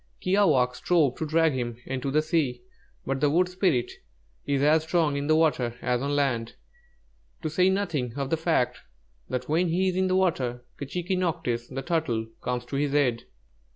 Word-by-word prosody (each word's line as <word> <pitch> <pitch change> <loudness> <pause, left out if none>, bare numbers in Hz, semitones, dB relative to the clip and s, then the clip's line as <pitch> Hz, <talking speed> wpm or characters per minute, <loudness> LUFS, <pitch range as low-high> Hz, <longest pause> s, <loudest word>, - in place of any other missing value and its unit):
Kiāwāhq' 155 -11 +3
strove 155 -7 +2
to 160 - -3
drag 160 0 +3
him 120 -3 -3
into 135 +1 -3
the 155 +3 +2
sea, 145 -7 0 0.4
but 135 0 -1
the 145 - +4
wood 175 +5 +3
spirit 180 -9 0 0.6
is 140 -1 +1
as 155 +2 +5
strong 160 -2 +1
in 140 0 -2
the 155 - +4
water 140 -7 +1
as 125 -1 0
on 140 +1 -1
land, 120 -5 0 0.9
to 155 - -2
say 180 +4 +3
nothing 170 - -1
of 140 -1 -3
the - - +4
fact 160 -6 0 0.5
that 125 0 -3
when 165 +4 +2
he 185 +3 +1
is 180 - -3
in 190 0 +2
the 185 - +1
water, 125 -10 0
'K'chīquī 175 +6 -2
nocktsh,' 160 -10 -1
the 135 - -3
Turtle, 150 -10 -1 0.2
comes 125 -1 -3
to 135 - -4
his 145 0 0
aid. 125 -5 +1
145 Hz, 185 wpm, -26 LUFS, 125-170 Hz, 0.9 s, as